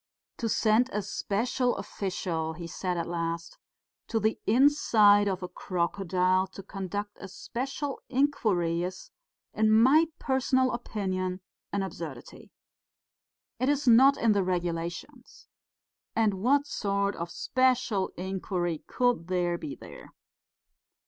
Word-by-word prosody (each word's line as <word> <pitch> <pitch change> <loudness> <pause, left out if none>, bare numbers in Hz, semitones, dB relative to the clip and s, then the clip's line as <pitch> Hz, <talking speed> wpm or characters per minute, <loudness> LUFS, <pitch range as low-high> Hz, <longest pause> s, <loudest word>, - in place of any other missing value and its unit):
"To 230 - -2
send 220 +4 +3
a 210 - -2
special 235 +5 -1
official," 180 -5 -3
he 170 +1 -8
said 180 +2 -3
at 170 - -1
last, 170 0 -4 0.5
"to 225 - 0
the 220 +1 0
inside 215 -5 +5
of 190 -2 -2
a - - -3
crocodile 185 +1 0
to 195 - -9
conduct 205 +1 -5
a - - -7
special 270 +8 -5
inquiry 215 -12 +1
is, 185 +1 -6 0.4
in 215 0 +2
my 265 +9 +6
personal 260 -1 +1
opinion, 185 -5 -3 0.3
an 200 -1 -1
absurdity. 160 -9 -8 1.1
It 255 +2 +1
is 290 -1 0
not 260 +4 +7
in 230 - +3
the 200 -1 +3
regulations. 180 - -4 0.7
And 220 -2 +3
what 280 +5 +3
sort 200 -5 -1
of 170 0 -5
special 250 -4 +1
inquiry 180 -2 -3
could 245 -9 0
there 175 -1 0
be 295 -1 -6
there?" - - -13
200 Hz, 120 wpm, -28 LUFS, 180-245 Hz, 1.1 s, not